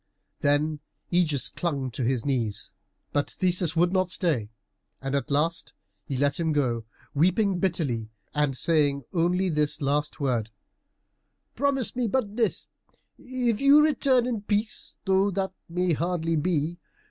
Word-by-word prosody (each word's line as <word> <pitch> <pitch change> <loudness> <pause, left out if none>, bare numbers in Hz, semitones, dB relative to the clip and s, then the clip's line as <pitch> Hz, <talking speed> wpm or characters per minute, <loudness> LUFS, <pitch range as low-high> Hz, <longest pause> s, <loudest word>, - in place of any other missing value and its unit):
Then 150 +1 +1 0.3
Ægeus 155 -6 +2
clung 140 -7 -2
to 115 - -5
his 120 -1 0
knees, 120 -7 -1 0.4
but 145 0 +1
Theseus 180 -2 +1
would 175 +2 +3
not 185 -1 +2
stay, 155 - 0 0.5
and 135 0 -4
at 140 - -1
last 155 +4 0 0.3
he 135 -3 -2
let 140 +3 +1
him 160 -2 +1
go, 120 -6 0 0.3
weeping 185 +5 +2
bitterly, 145 - -1 0.2
and 145 -3 +1
saying 145 -3 +2
only 180 +2 +2
this 150 -3 0
last 145 +1 -1
word, 120 -6 0 1.0
"Promise 270 -2 0
me 245 -2 0
but 215 -3 -1
this, 230 -2 0 0.5
if 250 -3 -1
you 285 +2 +7
return 265 -5 +3
in 235 -4 -2
peace, 210 +1 -2
though 190 +1 +3
that 190 0 -2 0.2
may 180 0 +1
hardly 165 +1 0
be. 165 +1 0
165 Hz, 140 wpm, -26 LUFS, 145-195 Hz, 1.0 s, you